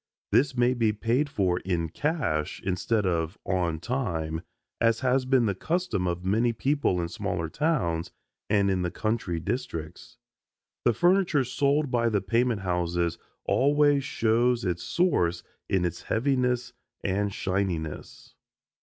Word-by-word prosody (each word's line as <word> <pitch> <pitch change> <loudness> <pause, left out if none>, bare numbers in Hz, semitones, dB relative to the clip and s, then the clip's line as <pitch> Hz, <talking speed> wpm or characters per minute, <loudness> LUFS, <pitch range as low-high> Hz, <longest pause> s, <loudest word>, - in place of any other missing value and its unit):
This 130 -1 +3
may 120 +1 +4
be 115 -3 +2
paid 120 +7 0
for 90 -7 +1
in 85 -3 -2
cash 115 - -1
instead 100 +3 0
of 85 -1 -1
"on 85 -4 0
time," 85 -8 -2 0.4
as 115 -1 +2
has 130 0 +2
been 130 -2 +3
the 100 - +1
custom 155 - -1
of 90 +1 -3
many 115 +5 +2
people 135 -6 +1
in 85 - -1
smaller 85 -1 -3
towns 100 - 0 0.4
and 100 -1 +3
in 95 -1 0
the 90 - 0
country 110 -4 -2
districts. 120 -1 -5 0.7
The 120 - +5
furniture 175 - +3
sold 140 +3 +1
by 115 -2 +2
the 105 -2 +1
payment 115 +2 +1
houses 85 -2 -1 0.3
always 145 +1 +3
shows 120 -2 +1
its 90 -1 -1
source 90 - +1 0.3
in 95 -2 +2
its 85 - -3
heaviness 125 -1 0 0.3
and 100 +1 0
shininess. 90 -6 -3
110 Hz, 135 wpm, -27 LUFS, 90-130 Hz, 0.7 s, The